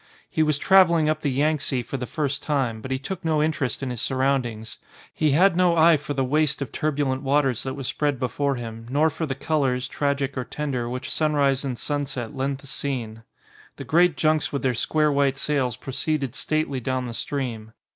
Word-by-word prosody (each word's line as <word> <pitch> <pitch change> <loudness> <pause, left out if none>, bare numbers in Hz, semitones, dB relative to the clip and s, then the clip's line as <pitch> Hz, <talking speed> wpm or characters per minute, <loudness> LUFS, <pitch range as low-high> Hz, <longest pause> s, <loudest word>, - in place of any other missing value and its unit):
He - - +1
was 155 -2 +2
travelling 170 -2 +5
up 155 0 -3
the 145 - 0
Yangtze 140 -2 0
for 135 - -6
the 125 -2 -3
first 145 -3 -2
time, 130 -7 -1
but 130 - -7
he 130 - 0
took 185 +7 -6
no 160 -2 +1
interest 155 -4 -1
in 130 - -2
his 120 -2 -5
surroundings. 130 -5 -1 0.3
He 155 - +1
had 180 +4 +5
no 175 -1 +3
eye 165 +1 +7
for 145 0 -5
the 135 - +1
waste 150 +2 +1
of 140 - -4
turbulent 140 -3 -1
waters 135 -3 +1
that 130 0 -4
was 135 -2 -6
spread 145 +1 0
before 140 +2 0
him, 115 -1 -7
nor 150 +4 +2
for 160 - -3
the 135 - -2
colours, 135 -4 0
tragic 140 0 -1
or 130 - -2
tender, 130 -4 -3
which 125 +1 -5
sunrise 145 -3 +2
and 130 -3 -3
sunset 140 -3 -3
lent 135 +1 -2
the - - -15
scene. 130 -5 -4 0.5
The - - -7
great 170 -1 +3
junks 155 0 +2
with 140 - -3
their 130 -1 +2
square 150 +6 +1
white 140 -1 +2
sails 135 -5 0
proceeded 135 -1 -2
stately 155 -4 -1
down 130 +1 -2
the 120 - -5
stream. 115 -5 -4
140 Hz, 200 wpm, -24 LUFS, 130-150 Hz, 0.5 s, eye